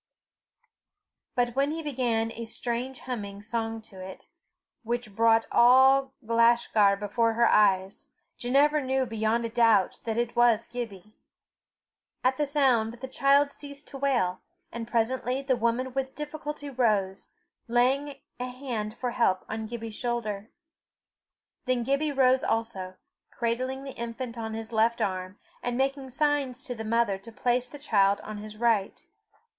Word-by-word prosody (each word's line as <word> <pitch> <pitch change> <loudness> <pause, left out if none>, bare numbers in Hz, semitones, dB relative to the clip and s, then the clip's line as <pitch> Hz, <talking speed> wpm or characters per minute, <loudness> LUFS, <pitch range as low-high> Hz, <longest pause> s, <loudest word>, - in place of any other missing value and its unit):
But 245 -1 0
when 275 +1 +2
he 320 +1 -4
began 240 -6 0
a 230 0 -6
strange 245 +3 -3
humming 205 -5 -6
song 225 0 -3
to 195 -3 -13
it, 190 0 -10 0.6
which 235 -3 -4
brought 225 0 +4
all 265 +2 +6
Glashgar 230 -3 +4
before 225 +3 0
her 235 +1 +3
eyes, 195 -2 +2 0.3
Ginevra 285 +4 +2
knew 265 0 +1
beyond 225 0 0
a - - -2
doubt 225 -5 +3
that 225 -1 -2
it 240 0 -1
was 235 -2 +4
Gibbie. 215 -4 -7 1.1
At 255 +1 +2
the 295 - 0
sound 255 -6 +2
the 245 +2 -8
child 280 +2 +3
ceased 285 0 -10
to 275 - -8
wail, 240 -10 +1 0.3
and 230 -1 -6
presently 250 +3 0
the 265 -2 +2
woman 240 +2 -1
with 265 0 -3
difficulty 300 -1 -6
rose, 210 -8 0 0.4
laying 270 +4 +1 0.2
a 250 +1 -3
hand 240 -4 -5
for 250 -1 -2
help 190 -6 +1
on 220 0 -4
Gibbie's 225 -1 -6
shoulder. 215 -3 -3 1.2
Then 255 -2 +1
Gibbie 280 +4 0
rose 260 -1 +3
also, 225 -5 -2 0.3
cradling 255 +3 -2
the 275 - -6
infant 235 +1 -5
on 220 -1 -5
his 225 +1 -7
left 230 +1 +2
arm, 185 0 -2 0.2
and 245 0 -2
making 270 0 -1
signs 275 -1 0
to 250 - -5
the 225 -2 -6
mother 220 -3 +1
to 230 +4 -12
place 245 +2 0
the 290 - -10
child 200 -8 +2
on 215 0 -7
his 215 0 -9
right. 225 -4 +1
235 Hz, 150 wpm, -27 LUFS, 220-265 Hz, 1.2 s, all